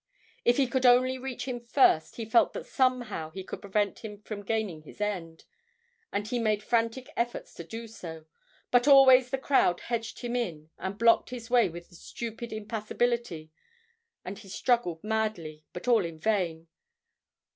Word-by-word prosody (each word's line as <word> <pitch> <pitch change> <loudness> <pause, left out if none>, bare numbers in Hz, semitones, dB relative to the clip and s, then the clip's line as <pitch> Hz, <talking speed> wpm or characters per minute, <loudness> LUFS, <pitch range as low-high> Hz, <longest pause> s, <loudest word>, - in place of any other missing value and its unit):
If 240 - +3
he 275 - +4
could 260 +1 -1
only 255 +1 +4
reach 260 -1 -5
him 250 -2 -3
first, 235 - +3
he 230 - -5
felt 225 +2 +3
that - - -6
somehow 245 - 0
he 190 +4 -7
could - - -8
prevent 200 0 -1
him 210 -2 -8
from 210 -2 -6
attaining 205 -6 -2
his 155 - -15
end, 180 -6 -4 0.7
and 205 +1 -2
he 245 +2 -1
made 215 -2 0
frantic 230 +2 0
efforts 235 0 -3
to 170 - -8
do 225 +7 -7
so; 165 -7 -9 0.5
but 245 +2 +4
always 260 -3 +8
the 270 - -1
crowd 265 -10 +2
hedged 230 -2 -4
him 240 -1 -3
in 160 -10 -3
and 190 +1 -4
blocked 230 0 +4
his 240 -2 -8
way 240 -5 +5
with 170 +2 -10
a - - -18
stupid 230 +6 -7
impassibility, 215 -5 -2 0.7
and 190 +3 -6
he 200 -2 -14
struggled 190 -6 0
madly, 215 -9 -2
but 175 - -8
all 230 -5 +4
in 165 -2 -6
vain. 170 -4 -1
220 Hz, 170 wpm, -28 LUFS, 180-240 Hz, 0.7 s, always